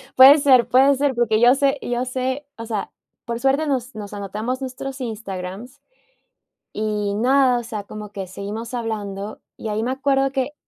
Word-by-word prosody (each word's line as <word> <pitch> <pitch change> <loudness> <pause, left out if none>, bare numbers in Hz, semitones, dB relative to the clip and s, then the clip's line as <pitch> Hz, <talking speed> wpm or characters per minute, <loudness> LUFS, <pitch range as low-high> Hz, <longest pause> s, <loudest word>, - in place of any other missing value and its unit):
Puede 270 +3 +10
ser, 260 -5 +5
puede 265 +3 +5
ser, 280 0 +1
porque 230 -2 +2
yo 245 +3 +6
sé 275 0 +1
yo 245 +1 -2
sé, 260 +3 -3
o 230 - -6
sea, 220 -3 -3 0.3
por 235 0 -3
suerte 270 +4 +1
nos 260 -3 -2
nos 210 -1 -7
anotamos 210 +6 -4
nuestros 265 +1 -6
Instagrams, 210 0 -6 0.9
y 210 -1 -1
nada, 255 +2 +3
o - - -6
sea, 220 -3 -5
como 210 +1 -8
que 195 -2 -6
seguimos 210 +5 -6
hablando 210 -3 -4 0.2
y - - -6
ahí 215 +1 -1
me 245 - -1
acuerdo 270 0 +1
que 270 +1 -2
240 Hz, 175 wpm, -22 LUFS, 215-265 Hz, 0.9 s, Puede